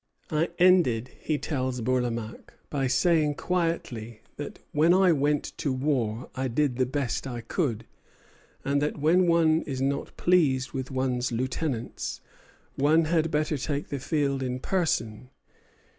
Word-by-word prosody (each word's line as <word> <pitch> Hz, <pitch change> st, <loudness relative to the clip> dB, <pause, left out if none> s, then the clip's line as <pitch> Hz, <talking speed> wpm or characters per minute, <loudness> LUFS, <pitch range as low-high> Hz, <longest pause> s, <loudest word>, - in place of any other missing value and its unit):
"I 155 Hz, +2 st, +1 dB
ended," 150 Hz, -10 st, +4 dB
he 155 Hz, -, -1 dB
tells 130 Hz, -4 st, -2 dB
Bourlamaque, 115 Hz, -2 st, -2 dB, 0.2 s
"by 135 Hz, -3 st, 0 dB
saying 150 Hz, +2 st, +2 dB
quietly 135 Hz, -11 st, -2 dB
that 145 Hz, -, -7 dB
when 160 Hz, +4 st, +4 dB
I 190 Hz, -1 st, +5 dB
went 145 Hz, -1 st, 0 dB
to 140 Hz, -, 0 dB
war 130 Hz, -4 st, -1 dB
I 130 Hz, 0 st, -2 dB
did 125 Hz, +1 st, 0 dB
the 130 Hz, -2 st, +2 dB
best 135 Hz, -1 st, -2 dB
I 120 Hz, -2 st, -5 dB
could; 115 Hz, -, -2 dB, 0.8 s
and 140 Hz, +1 st, +1 dB
that 150 Hz, -, -1 dB
when 170 Hz, +5 st, +3 dB
one 165 Hz, -1 st, +4 dB
is 135 Hz, -3 st, -3 dB
not 140 Hz, +1 st, -2 dB
pleased 145 Hz, -7 st, +2 dB
with 130 Hz, -2 st, -4 dB
one's 130 Hz, -2 st, -1 dB
lieutenants, 130 Hz, +1 st, -3 dB, 0.6 s
one 155 Hz, +4 st, +4 dB
had 165 Hz, 0 st, +1 dB
better 150 Hz, -1 st, 0 dB
take 145 Hz, +1 st, -3 dB
the 140 Hz, -, -3 dB
field 140 Hz, -1 st, 0 dB
in 125 Hz, -1 st, -2 dB
person. 130 Hz, -, -1 dB
140 Hz, 145 wpm, -27 LUFS, 125-155 Hz, 0.8 s, I